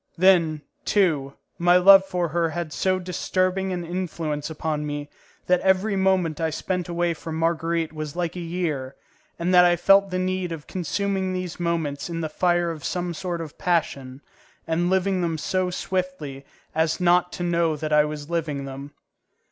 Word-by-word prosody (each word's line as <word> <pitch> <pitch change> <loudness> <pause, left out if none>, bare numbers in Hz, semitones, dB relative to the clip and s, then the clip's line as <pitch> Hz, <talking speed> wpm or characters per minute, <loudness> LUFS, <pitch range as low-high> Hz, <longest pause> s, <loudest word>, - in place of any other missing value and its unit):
Then, 165 -4 +4 0.2
too, 155 -9 +1 0.2
my 175 +1 +5
love 195 +1 +8
for 180 -3 -2
her 165 +1 +1
had 160 -1 -4
so 185 -1 +1
disturbing 185 +1 -1
an 175 -2 -3
influence 165 -4 -3
upon 155 -1 -2
me 145 0 -5 0.3
that 180 0 +3
every 190 +2 +2
moment 185 -5 +1
I 160 - +1
spent 180 +3 -3
away 170 0 0
from 160 0 -7
Marguerite 165 0 0
was 155 -1 -6
like 175 -1 -2
a - - -4
year, 165 -6 -3 0.4
and 175 +2 0
that 180 0 +8
I 175 0 +5
felt 195 +3 +5
the 185 - -2
need 185 -1 -1
of 160 -3 -6
consuming 190 +1 -2
these 185 -1 -4
moments 165 -4 -2
in 165 -1 -3
the 160 - -2
fire 175 +1 +1
of 155 -3 -8
some 175 -1 -2
sort 175 -1 -4
of 155 -3 -9
passion, 140 -6 -1 0.4
and 165 +2 0
of - - +1
living 190 0 +1
them 165 -2 -1
so 185 +4 -1
swiftly 180 -7 -4 0.3
as 160 +2 +1
not 180 0 +3
to 175 - -4
know 170 -2 +1
that 155 +1 -3
I 150 0 +6
was 150 -1 -5
living 155 -5 -2
them. 140 +2 -8
170 Hz, 180 wpm, -24 LUFS, 155-185 Hz, 0.4 s, love